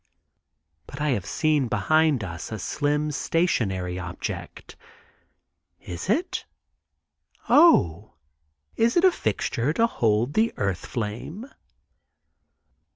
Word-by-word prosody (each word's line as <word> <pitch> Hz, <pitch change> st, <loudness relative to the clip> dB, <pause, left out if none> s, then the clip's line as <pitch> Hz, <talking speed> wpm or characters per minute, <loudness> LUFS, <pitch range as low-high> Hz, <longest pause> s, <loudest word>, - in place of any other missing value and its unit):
But 135 Hz, -, -9 dB
I 150 Hz, 0 st, 0 dB
have 110 Hz, -9 st, -1 dB
seen 155 Hz, -5 st, +1 dB
behind 155 Hz, -1 st, +2 dB
us 85 Hz, 0 st, -7 dB
a 110 Hz, -, -3 dB
slim 150 Hz, +7 st, -1 dB
stationary 95 Hz, -, -1 dB
object. 90 Hz, -1 st, -7 dB, 1.0 s
Is 90 Hz, -, -7 dB
it? 325 Hz, -, 0 dB, 1.0 s
Oh, 105 Hz, -, +4 dB, 0.6 s
is 230 Hz, +5 st, +2 dB
it 345 Hz, -, +4 dB
a 375 Hz, -, +7 dB
fixture 115 Hz, -, -1 dB
to 230 Hz, -, +3 dB
hold 115 Hz, -, 0 dB
the 225 Hz, +1 st, +1 dB
earth 100 Hz, -2 st, -2 dB
flame? 120 Hz, -, -5 dB
135 Hz, 100 wpm, -25 LUFS, 100-165 Hz, 1.0 s, a